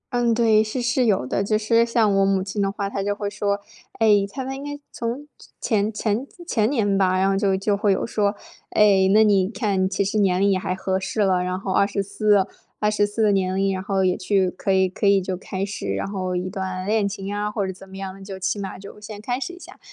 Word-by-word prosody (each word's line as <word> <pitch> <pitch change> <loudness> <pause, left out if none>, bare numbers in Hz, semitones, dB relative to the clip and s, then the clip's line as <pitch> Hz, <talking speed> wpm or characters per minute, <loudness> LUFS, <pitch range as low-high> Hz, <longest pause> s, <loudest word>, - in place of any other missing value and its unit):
嗯， 240 -1 +2
对， 225 -2 +4
是 220 +4 -2
是 245 +1 +1
有 200 - +2
的。 130 - -1
就 215 +2 +1
是 230 +2 +3
像 230 -3 +2
我 195 0 +3
母 195 -1 +1
亲 200 +2 -3
的 195 - +1
话 200 0 -3
她 200 - -3
就 205 +1 -1
会 205 -1 -3
说， 200 0 -1 0.3
哎， 225 - +1 0.2
她 265 +6 -5
们 265 +1 -4
应 275 - -8
该 290 0 -5
从 240 +5 -4 0.4
前 215 -2 +1
前 215 +4 -1 0.2
前 220 -9 +1
年 205 -8 +1
吧， 185 -1 +2
然 190 +1 +2
后 195 - +1
就 195 -1 +2
就 200 +1 0
会 200 -1 +2
有 190 - -1
说， 210 -2 0 0.4
“哎， 195 -3 +5
那 215 +1 +6
你 200 -3 +3
看 200 -3 0
其 195 +1 0
实 200 +2 -1
年 185 -3 +2
龄 200 0 +4
也 190 - +1
还 185 - -2
合 190 0 -1
适 190 +3 -2
了， 190 -3 +3
然 180 0 -2
后 190 0 -4
二 200 - +3
十 200 -1 -2
四 205 0 +2 0.3
二 210 0 +2
十 205 -1 +2
四 215 +2 -1
的 210 - +4
年 190 -1 +1
龄， 195 0 +1
然 185 - -3
后 195 0 0
也 180 -1 +2
去 190 -1 +1
可 190 +2 -2
以 190 0 +3
可 195 +2 -1
以 200 -1 +5
就 185 0 -3
开 190 +1 -5
始， 100 - -4
然 100 - -2
后 185 -2 -3
一 180 +1 -2
段 185 -1 -4
恋 210 0 +1
情 195 0 -5
啊， 205 0 -1
或 205 -1 -2
者 190 - -3
怎 190 +1 -13
么 190 - -12
样， 195 0 -7
就 195 0 -7
起 195 +2 -2
码 195 -1 -5
就 200 +2 -11
先 210 0 -9
开 245 +3 -2
始 275 +6 -5
一 355 - -12
下。” - - -13
200 Hz, 275 characters per minute, -23 LUFS, 190-215 Hz, 0.4 s, 那